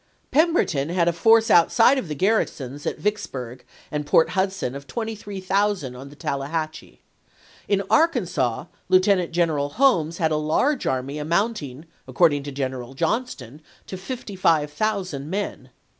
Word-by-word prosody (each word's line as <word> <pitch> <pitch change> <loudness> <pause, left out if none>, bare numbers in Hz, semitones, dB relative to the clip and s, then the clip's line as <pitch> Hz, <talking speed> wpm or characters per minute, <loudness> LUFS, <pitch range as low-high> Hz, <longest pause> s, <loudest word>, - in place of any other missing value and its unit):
Pemberton 290 - +2
had 175 -1 +1
a 170 - +2
force 225 +5 +4
out 170 -1 +5
side 255 +4 +5
of 205 - -6
the 150 - -4
garrisons 145 - -1
at - - -2
Vicksburg 130 - -4 0.3
and 150 0 -2
Port 155 +2 +3
Hud 190 0 +1
son 160 -10 -4
of 140 0 -9
23,000 200 - -2
on 135 +2 -10
the 145 - -14
Tallahatchie. 155 +3 -4 0.6
In 200 -1 +1
Arkansas, 180 - +1 0.2
Lieutenant 185 -1 +3
General 160 -4 0
Holmes 170 - +2
had 160 -1 +1
a 155 - +1
large 245 - 0
army 130 +3 -2
amounting, 160 - -2 0.2
according 155 -5 +3
to 140 +1 -7
General 130 -2 -4
Johnston, 155 - -3 0.2
to - - -7
p^uifua. 190 - 0
55,000 180 -6 -2
men. 200 +3 -4
170 Hz, 145 wpm, -23 LUFS, 145-205 Hz, 0.6 s, out